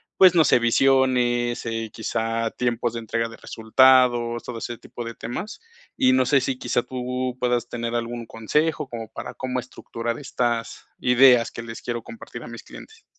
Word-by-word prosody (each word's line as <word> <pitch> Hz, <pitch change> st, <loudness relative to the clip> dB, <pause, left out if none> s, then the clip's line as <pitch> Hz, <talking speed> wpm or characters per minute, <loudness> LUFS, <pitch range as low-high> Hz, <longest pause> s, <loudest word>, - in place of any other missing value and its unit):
pues, 185 Hz, -2 st, +7 dB
no 160 Hz, -4 st, +5 dB
sé, -, -, +5 dB
visiones, 120 Hz, -1 st, +2 dB
eh, 115 Hz, -1 st, -3 dB
quizá 115 Hz, +1 st, -2 dB
tiempos 120 Hz, -1 st, -1 dB
de 115 Hz, -, -4 dB
entrega 115 Hz, +1 st, -2 dB
de 115 Hz, -, -11 dB
resultados, 120 Hz, 0 st, +3 dB
todo 120 Hz, -2 st, -6 dB
ese 120 Hz, 0 st, -5 dB
tipo 120 Hz, -, -9 dB
de 115 Hz, 0 st, -6 dB
temas. 205 Hz, -, -6 dB, 0.4 s
Y 130 Hz, 0 st, +4 dB
no 130 Hz, 0 st, +3 dB
sé 140 Hz, +2 st, +4 dB
si, 130 Hz, 0 st, -2 dB
quizá 120 Hz, -, -1 dB
tú 125 Hz, 0 st, -3 dB
puedas 120 Hz, -1 st, 0 dB
tener 120 Hz, -1 st, -4 dB
algún 120 Hz, 0 st, -3 dB
consejo 150 Hz, +9 st, 0 dB
como 115 Hz, -2 st, -6 dB
para, 125 Hz, -, -7 dB
cómo 125 Hz, 0 st, -3 dB
estructurar 115 Hz, 0 st, -5 dB
estas 120 Hz, -4 st, -2 dB
ideas 125 Hz, -1 st, +5 dB
que 115 Hz, -, -7 dB
les 115 Hz, 0 st, -8 dB
quiero 120 Hz, -1 st, -4 dB
compartir 230 Hz, -1 st, -10 dB
a -, -, -9 dB
mis -, -, -9 dB
clientes. 440 Hz, -, -13 dB
120 Hz, 180 wpm, -23 LUFS, 115-130 Hz, 0.4 s, pues